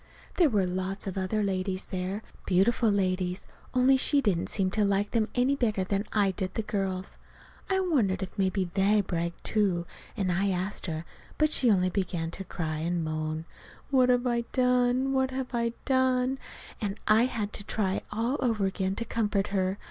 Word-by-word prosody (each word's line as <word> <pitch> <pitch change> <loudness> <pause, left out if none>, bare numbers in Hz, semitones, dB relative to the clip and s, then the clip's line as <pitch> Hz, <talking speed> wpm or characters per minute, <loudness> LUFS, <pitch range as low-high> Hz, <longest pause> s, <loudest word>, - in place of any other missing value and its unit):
There 340 -5 +5
were 205 -6 +2
lots 185 +2 -2
of 195 - -4
other 195 +3 0
ladies 190 -1 -1
there 190 +3 -4 0.2
beautiful 215 +5 +3
ladies 185 -2 0 0.3
only 260 +1 +5
she 285 +2 +3
didn't 200 -10 0
seem 190 -2 0
to 210 +1 +2
like 200 0 +1
them 225 -2 +1
any 255 +3 +3
better 215 -7 0
than 200 +2 -1
I 205 -2 +3
did 185 0 -4
the 225 - -1
girls. 190 -2 -3 0.5
I 380 0 +2
wondered 220 - +1
if 185 - -7
maybe 190 -2 0
they 200 +2 +4
bragged, 170 -3 -3
too, 190 -5 +1 0.3
and 190 -4 0
I 195 +3 +1
asked 190 +2 -2
her; 160 0 -4 0.3
but 305 0 +3
she 250 - +4
only 185 -3 +3
began 175 -4 -2
to 195 - -6
cry 160 -4 -3
again, 170 +3 -1
and 170 -2 0
moan, 155 0 -3 0.5
"What 255 -2 +4
have 245 0 +3
I 235 -1 0
done, 250 +1 +2
what 265 -1 +2
have 260 -1 -4
I 235 -1 0
done?" 260 0 +2 0.4
and 205 0 -3
I 220 +3 +5
had 215 -5 -3
to 205 - -5
try 195 -2 -1
all 230 +6 0
over 225 -6 +1
again 190 0 -1
to 230 - -2
comfort 210 -3 0
her. 190 -1 0
200 Hz, 185 wpm, -28 LUFS, 185-240 Hz, 0.5 s, There